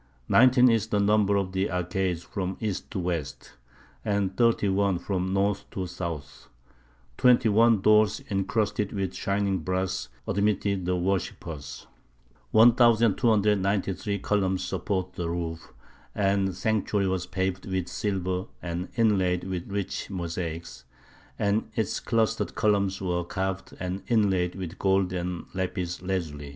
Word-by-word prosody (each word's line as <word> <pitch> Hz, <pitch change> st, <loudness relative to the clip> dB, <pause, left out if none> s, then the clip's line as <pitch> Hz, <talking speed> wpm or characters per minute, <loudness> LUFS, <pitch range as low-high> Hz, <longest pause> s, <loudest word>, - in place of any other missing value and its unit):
Nineteen 125 Hz, 0 st, +6 dB
is 115 Hz, -3 st, +2 dB
the 105 Hz, -2 st, 0 dB
number 100 Hz, 0 st, +3 dB
of 95 Hz, -2 st, 0 dB
the 95 Hz, +1 st, 0 dB
arcades 90 Hz, 0 st, -1 dB
from 95 Hz, -2 st, -4 dB
east 105 Hz, -4 st, -3 dB
to -, -, -5 dB
west, 85 Hz, -5 st, -4 dB, 0.5 s
and 100 Hz, -2 st, 0 dB
thirty 115 Hz, -3 st, +3 dB
one 100 Hz, -1 st, +2 dB
from 95 Hz, +1 st, -2 dB
north 100 Hz, +1 st, 0 dB
to 95 Hz, -, -4 dB
south; 85 Hz, -5 st, -6 dB, 0.7 s
twenty 125 Hz, -2 st, +5 dB
one 110 Hz, 0 st, +4 dB
doors 105 Hz, 0 st, +4 dB
encrusted 105 Hz, +1 st, 0 dB
with 95 Hz, -3 st, -2 dB
shining 100 Hz, -1 st, 0 dB
brass 95 Hz, -5 st, -2 dB, 0.2 s
admitted 100 Hz, -2 st, 0 dB
the 90 Hz, -, +1 dB
worshippers; 85 Hz, -6 st, -3 dB, 0.6 s
1,293 105 Hz, -, +3 dB
columns 95 Hz, -2 st, 0 dB
support 95 Hz, 0 st, -2 dB
the 85 Hz, -1 st, -3 dB
roof, 85 Hz, -1 st, -4 dB, 0.4 s
and 100 Hz, -1 st, +2 dB
the 95 Hz, -, -3 dB
sanctuary 105 Hz, 0 st, 0 dB
was 95 Hz, -1 st, -1 dB
paved 95 Hz, 0 st, -2 dB
with 95 Hz, -2 st, -2 dB
silver 95 Hz, -2 st, -2 dB
and 85 Hz, +1 st, -4 dB
inlaid 95 Hz, -6 st, +2 dB
with 95 Hz, -1 st, -4 dB
rich 100 Hz, -1 st, -3 dB
mosaics, 85 Hz, -2 st, -5 dB, 0.5 s
and 100 Hz, +2 st, 0 dB
its 110 Hz, -6 st, -1 dB
clustered 110 Hz, -1 st, 0 dB
columns 100 Hz, -2 st, +1 dB
were 90 Hz, -2 st, -1 dB
carved 95 Hz, +1 st, -4 dB
and 90 Hz, +1 st, -3 dB
inlaid 95 Hz, -6 st, +2 dB
with 95 Hz, -1 st, -7 dB
gold 95 Hz, -1 st, +2 dB
and 90 Hz, -1 st, -3 dB
lapis 90 Hz, -2 st, -3 dB
lazuli. 80 Hz, -6 st, -3 dB
95 Hz, 130 wpm, -27 LUFS, 90-105 Hz, 0.7 s, Nineteen